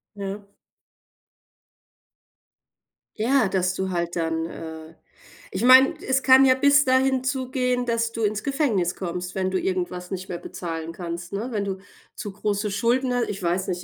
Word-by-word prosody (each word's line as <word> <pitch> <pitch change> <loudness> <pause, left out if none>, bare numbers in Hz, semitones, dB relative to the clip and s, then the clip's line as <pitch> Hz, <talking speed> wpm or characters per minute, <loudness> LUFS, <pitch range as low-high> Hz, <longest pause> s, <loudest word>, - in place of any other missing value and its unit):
Ja. 200 0 -6 2.7
Ja, 240 -2 +3
dass 185 -1 0
du 190 0 -3
halt 170 -1 -2
dann 165 -1 -1
äh, 160 -1 -9 0.6
ich 190 +5 -3
meine, 260 +2 +7
es 265 0 +1
kann 265 0 +7
ja 255 0 +5
bis 280 +1 +5
dahin 260 0 +2
zugehen, 255 -2 -1
dass 230 -1 0
du 230 -1 -4
ins 210 0 0
Gefängnis 245 - 0
kommst, 180 0 -5
wenn 190 -1 -1
du 185 - 0
irgendwas 180 -1 -3
nicht 185 0 -5
mehr 175 - -3
bezahlen 165 -2 -6
kannst, 170 +1 -7
ne? 215 +5 -3
Wenn 205 -2 -2
du 190 -1 -4 0.4
zu 205 - -6
große 205 +1 -2
Schulden 245 +5 +1
hast 245 -1 0
ich 200 -1 -5
weiß 180 +2 -1
nicht, 180 0 -3
200 Hz, 160 wpm, -24 LUFS, 180-255 Hz, 2.7 s, meine